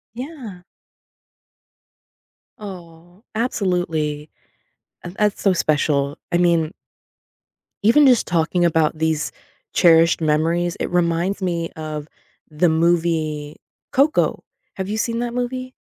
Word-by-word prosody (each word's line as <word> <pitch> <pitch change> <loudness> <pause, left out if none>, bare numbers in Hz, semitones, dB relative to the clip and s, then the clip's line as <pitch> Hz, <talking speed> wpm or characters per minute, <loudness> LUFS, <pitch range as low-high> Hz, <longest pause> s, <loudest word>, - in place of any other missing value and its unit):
Yeah. 250 - -8 1.9
Oh, 175 -1 -11
absolutely. 175 -9 -1 0.7
Uh, 175 - -6
that's 210 -1 +1
so 195 - +3
special. 145 -3 +1
I 175 - +3
mean 170 -2 +2 1.1
Even 275 +6 +6
just 245 -3 +4
talking 175 +1 +1
about 160 -2 +2
these 160 -1 -1 0.4
cherished 165 -1 +5
memories, 165 +3 +1
it - - -2
reminds 175 +3 0
me 170 -3 -1
of 155 -1 -6 0.4
the 155 +3 +2
movie 160 -2 0 0.3
Coco. 285 +4 +2 0.3
Have 190 0 -4
you 215 +1 -3
seen 230 +1 -1
that 240 0 -3
movie? 255 +1 -3
175 Hz, 105 wpm, -21 LUFS, 160-205 Hz, 1.9 s, Even